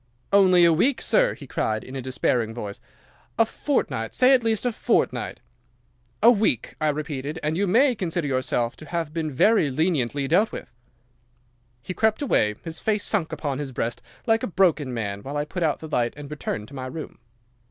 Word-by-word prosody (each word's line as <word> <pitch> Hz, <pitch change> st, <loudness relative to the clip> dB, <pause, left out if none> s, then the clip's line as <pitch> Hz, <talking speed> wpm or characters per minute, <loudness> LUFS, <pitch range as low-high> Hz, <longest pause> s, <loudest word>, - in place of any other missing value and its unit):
"'"Only 185 Hz, -3 st, +6 dB
a 170 Hz, -, +5 dB
week, 245 Hz, -, +2 dB
sir?" -, -, +2 dB
he -, -, -11 dB
cried, 110 Hz, 0 st, -2 dB
in 130 Hz, -, -9 dB
a 135 Hz, -, -3 dB
despairing 125 Hz, -3 st, -1 dB
voice. 105 Hz, -4 st, -6 dB, 0.6 s
"A 225 Hz, -, +5 dB
fortnight—say 255 Hz, -, +1 dB
at 255 Hz, -3 st, +4 dB
least 225 Hz, 0 st, 0 dB
a 245 Hz, -, +2 dB
fortnight!" -, -, 0 dB, 0.8 s
"'"A 235 Hz, -, +9 dB
week," 210 Hz, -, 0 dB
I 155 Hz, -, +2 dB
repeated, 150 Hz, 0 st, -4 dB
"and 155 Hz, +1 st, 0 dB
you 200 Hz, +3 st, +1 dB
may 250 Hz, +8 st, +4 dB
consider 175 Hz, -6 st, -2 dB
yourself 130 Hz, -2 st, -1 dB
to 155 Hz, -, -12 dB
have 165 Hz, -3 st, -3 dB
been 160 Hz, -2 st, -2 dB
very 160 Hz, -, +3 dB
leniently 140 Hz, -2 st, 0 dB
dealt 185 Hz, +9 st, +3 dB
with." -, -, -8 dB, 1.1 s
"'He 185 Hz, -, -5 dB
crept 220 Hz, +7 st, +1 dB
away, 105 Hz, -, +2 dB
his 165 Hz, -1 st, -6 dB
face 215 Hz, -1 st, 0 dB
sunk 180 Hz, -8 st, -1 dB
upon 145 Hz, -3 st, -3 dB
his 140 Hz, -2 st, -4 dB
breast, 120 Hz, -1 st, -3 dB, 0.2 s
like 225 Hz, -1 st, +3 dB
a -, -, -2 dB
broken 170 Hz, -8 st, +2 dB
man, 100 Hz, -4 st, -3 dB
while 140 Hz, +6 st, -5 dB
I 145 Hz, -, -1 dB
put 180 Hz, +4 st, -5 dB
out 155 Hz, -3 st, 0 dB
the 160 Hz, -, -6 dB
light 120 Hz, -6 st, 0 dB
and 145 Hz, 0 st, -9 dB
returned 110 Hz, -7 st, -4 dB
to -, -, -15 dB
my 130 Hz, -2 st, -5 dB
room. 155 Hz, +4 st, -8 dB
155 Hz, 190 wpm, -24 LUFS, 130-200 Hz, 1.1 s, A